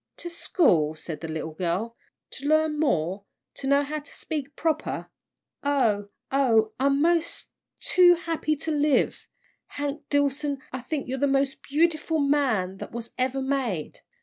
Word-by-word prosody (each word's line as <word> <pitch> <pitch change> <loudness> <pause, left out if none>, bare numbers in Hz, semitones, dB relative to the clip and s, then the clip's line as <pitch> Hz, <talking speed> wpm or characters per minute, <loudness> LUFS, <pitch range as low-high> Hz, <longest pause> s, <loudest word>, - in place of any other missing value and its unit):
"To 345 - -7
school!" 170 - +2
said 155 -1 -7
the 165 - -4
little 160 0 -4
girl, 185 +8 -2 0.4
"to 275 - -6
learn 310 0 +3
more 190 - 0 0.3
to 270 - -6
know 280 +1 +4
how 305 +2 -3
to 290 - -12
speak 290 -3 -5
proper! 315 -1 -2 0.5
Oh, 230 -8 +1 0.2
oh, 225 -6 +3
I'm 275 +2 +3
mos' 335 0 +1 0.3
too 355 -1 +6
happy 330 -2 -1
to 320 +2 -3
live! 295 -1 +1 0.4
Hank 290 0 -5
Dillson, 285 0 +1 0.2
I 255 - -3
think 275 +3 -3
you're 260 +1 -3
the 285 - +3
mos' 275 0 +2
beautiful 320 +3 0
man 265 -11 +1
that - - -8
was 235 0 -6
ever 260 +1 0
made!" 260 - -2
280 Hz, 150 wpm, -26 LUFS, 225-300 Hz, 0.5 s, too